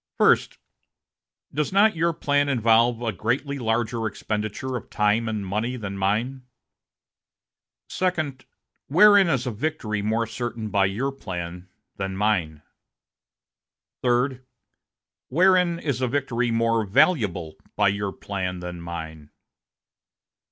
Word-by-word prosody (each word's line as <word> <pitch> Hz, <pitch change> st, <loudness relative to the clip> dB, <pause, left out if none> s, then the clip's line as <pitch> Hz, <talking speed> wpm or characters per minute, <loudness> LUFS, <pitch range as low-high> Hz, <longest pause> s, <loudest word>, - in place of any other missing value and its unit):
"First. -, -, +3 dB, 1.0 s
Does 150 Hz, +1 st, -1 dB
not 200 Hz, +1 st, +4 dB
your 170 Hz, +1 st, +2 dB
plan 145 Hz, -3 st, +1 dB
involve 115 Hz, -1 st, +3 dB
a 115 Hz, -, 0 dB
greatly 125 Hz, -, -2 dB
larger 115 Hz, -1 st, -1 dB
expenditure 110 Hz, +4 st, -4 dB
of 120 Hz, -, -6 dB
time 105 Hz, +2 st, +1 dB
and 105 Hz, -3 st, -3 dB
money 110 Hz, +6 st, -2 dB
than 100 Hz, -4 st, -5 dB
mine?" 110 Hz, +7 st, -1 dB, 1.5 s
"Second. 155 Hz, -8 st, -2 dB, 0.4 s
Wherein 200 Hz, +5 st, +6 dB
is 135 Hz, -6 st, 0 dB
a 125 Hz, -, -1 dB
victory 110 Hz, -4 st, -2 dB
more 110 Hz, +2 st, 0 dB
certain 115 Hz, -1 st, -5 dB
by 100 Hz, -1 st, +3 dB
your 120 Hz, +8 st, -2 dB
plan 90 Hz, -7 st, -7 dB, 0.3 s
than 95 Hz, -1 st, -3 dB
mine?" 90 Hz, -8 st, 0 dB, 1.4 s
"Third. 125 Hz, +1 st, +1 dB, 0.8 s
Wherein 180 Hz, +2 st, +3 dB
is 140 Hz, -6 st, -2 dB
a 130 Hz, -, +2 dB
victory 125 Hz, -2 st, -1 dB
more 115 Hz, 0 st, +1 dB
valuable 100 Hz, -, +1 dB, 0.2 s
by 100 Hz, -1 st, +3 dB
your 100 Hz, 0 st, -2 dB
plan 95 Hz, -2 st, -4 dB
than 90 Hz, -1 st, -7 dB
mine?" 80 Hz, -3 st, -7 dB
115 Hz, 115 wpm, -24 LUFS, 100-135 Hz, 1.5 s, Wherein